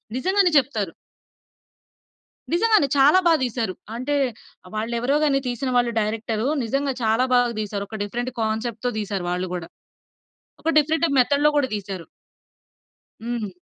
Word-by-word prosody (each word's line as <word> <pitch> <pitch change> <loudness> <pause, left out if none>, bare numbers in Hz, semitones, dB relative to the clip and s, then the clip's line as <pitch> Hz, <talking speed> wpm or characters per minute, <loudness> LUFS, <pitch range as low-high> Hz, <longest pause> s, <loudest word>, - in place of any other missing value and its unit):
నిజంగానే 375 +5 +2
చెప్తారు. 220 -10 0 1.6
నిజంగానే 430 -5 +4
చాలా 290 +7 +6
బా 330 - +6
దీశారు. 230 -5 -2 0.2
అంటే, 275 +4 -2 0.5
ఆహ్, 185 - -14
వాళ్ళెవరో 235 +6 0
గాని, 275 -2 +3
తీసిన 250 +2 -2
వాళ్ళు 240 -1 +2
డైరెక్టరు, 220 +2 -2 0.2
నిజంగా 275 +3 -1
చాలా 225 +3 +3
బాగా 245 -1 +3
తీశారు. 200 -1 -4
ఒక 220 -1 -6
డిఫరెంట్ 240 +5 -3
కాన్సెప్ట్‌తో 225 +2 -2
తీసారు 200 -3 -3
వాళ్ళు 180 0 -2
గూడా. 170 -2 -6 0.9
ఒక 325 - +1
డిఫరెంట్ 320 +3 +2
టైప్ 280 -4 +1
మెథడ్‌లో 285 +4 +3
గూడా 265 -2 +1
దీశారు. 190 -4 -6 1.2
హ్మ్. 235 -5 -3
240 Hz, 130 wpm, -23 LUFS, 215-280 Hz, 1.6 s, చాలా